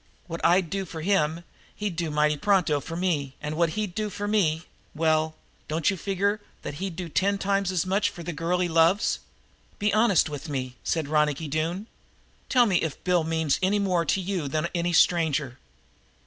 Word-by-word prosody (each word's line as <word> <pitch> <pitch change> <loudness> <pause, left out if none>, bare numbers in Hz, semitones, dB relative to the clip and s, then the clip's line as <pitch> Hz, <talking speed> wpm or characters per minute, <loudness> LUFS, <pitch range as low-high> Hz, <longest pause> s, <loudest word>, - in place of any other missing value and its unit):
What 170 -1 -6
I'd 175 -1 +3
do 195 0 -1
for 165 -2 -7
him 165 -2 +1 0.3
he'd 205 -4 -3
do 170 -1 -2
mighty 150 0 +2
pronto 175 -3 +2
for 165 +4 -7
me, 155 -7 -1
and 150 +1 -4
what 165 -1 +1
he'd 210 -4 -2
do 215 +2 -2
for 205 +1 -4
me 170 -7 +1 0.3
well, 155 0 +1 0.3
don't 160 +4 +1
you - - -2
figure 200 +3 -1 0.2
that - - -4
he'd 190 -3 -3
do 180 0 -5
ten 195 +5 +1
times 195 -1 0
as 180 -2 0
much 195 +2 +1
for 170 - -9
the 175 +1 -4
girl 165 +4 0
he 180 0 +1
loves? 165 +4 +3 0.6
Be 210 0 +1
honest 215 -6 +4
with 150 +1 -6
me," 130 -3 -3
said 160 -3 -1
Ronicky 150 0 +1
Doone. 165 +7 -2 0.6
"Tell 250 -2 +5
me 195 -5 +2
if 160 -4 -3
Bill 180 -2 +2
means 160 -2 0
anymore 190 -2 +2
to 195 - +1
you 185 -5 -2
than 155 +4 -1
any 175 0 0
stranger?" 155 -7 +2
170 Hz, 190 wpm, -26 LUFS, 155-195 Hz, 0.6 s, Tell